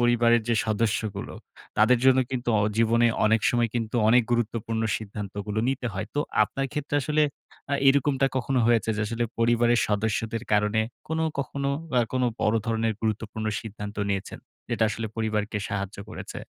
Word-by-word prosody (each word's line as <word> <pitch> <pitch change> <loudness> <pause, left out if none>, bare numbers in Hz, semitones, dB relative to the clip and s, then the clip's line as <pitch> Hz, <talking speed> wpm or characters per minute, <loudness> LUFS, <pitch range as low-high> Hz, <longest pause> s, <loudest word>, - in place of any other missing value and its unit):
পরিবারের 120 -1 +4
যে 115 - +3
সদস্যগুলো 110 -2 -1 0.4
তাদের 115 +3 +5
জন্য 130 0 +6
কিন্তু 125 -2 -3
অ - - +2 0.2
জীবনে 115 +1 +4 0.2
অনেক 110 0 +4
সময় 120 -1 +2
কিন্তু 115 0 -2
অনেক 120 +1 +6
গুরুত্বপূর্ণ 115 -1 -1
সিদ্ধান্তগুলো 105 0 -5
নিতে 135 -2 -1
হয়। 95 +2 -3
তো 145 - +1 0.2
আপনার 135 0 -1
ক্ষেত্রে 150 0 -3
আসলে 150 +2 +2 0.5
আ - - +4
এরকমটা 135 0 +3
কখনো 130 +1 0
হয়েছে 115 -2 +3
যে, - - -2
আসলে 115 +2 -1
পরিবারের 120 +1 +3
সদস্যদের 110 +2 -1
কারণে 105 +1 +3 0.3
কোন 160 0 -1 0.2
কখনো 140 0 -2 0.3
আ - - +5
কোন 130 0 0 0.2
বড় 105 +2 +2
ধরনের 115 0 +1
গুরুত্বপূর্ণ 110 0 -2
সিদ্ধান্ত 105 -1 -7
নিয়েছেন? 100 -1 -3 0.3
যেটা 110 - +1
আসলে 115 0 -3
পরিবারকে 110 -1 -1
সাহায্য 100 0 -4
করেছে - - -7
115 Hz, 155 wpm, -26 LUFS, 110-120 Hz, 0.5 s, জন্য